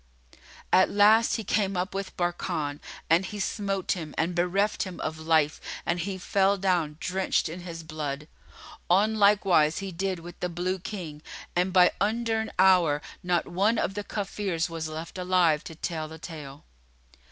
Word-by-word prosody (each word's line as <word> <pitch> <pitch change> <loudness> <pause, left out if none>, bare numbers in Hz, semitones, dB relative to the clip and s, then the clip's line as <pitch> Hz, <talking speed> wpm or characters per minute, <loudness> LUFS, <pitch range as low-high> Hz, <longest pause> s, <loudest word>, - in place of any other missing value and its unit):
At 185 - +6
last 215 +3 +5
he 225 - -3
came 195 -1 0
up 180 +3 -2
with 195 0 -5
Barkan 170 -4 -2 0.3
and 165 +3 +4 0.2
smote 195 -1 -1
him 160 -5 -3
and 170 +2 0
bereft 180 +4 +1
him 185 -2 -4
of 160 0 -4
life 160 -2 +2 0.2
and 170 +1 0
he 190 +2 -3
fell 195 +2 +2
down, 175 -6 0
drenched 185 0 0
in 165 +3 -6
his 170 -2 -7
blood. 150 -2 -5 0.6
On 200 +5 +4
like 205 0 +5
wise 155 -4 +4
he 195 -1 -4
did 190 +2 -2
with 170 +1 -11
the 180 - -2
Blue 180 +2 -2
King, 170 -6 -7 0.3
and 180 +2 +2
by 180 -1 +6
undurn 220 +1 0
hour 180 -6 +5 0.2
not 175 -1 0
one 205 +6 +1
of 195 - 0
the 205 +1 -4
Kafirs 195 -5 -2
was 165 -1 -4
left 160 +4 -7
alive 180 -4 +3
to 160 - -8
tell 160 -1 -3
the 160 +1 -10
tale. 150 -3 -9
180 Hz, 165 wpm, -27 LUFS, 160-195 Hz, 0.6 s, At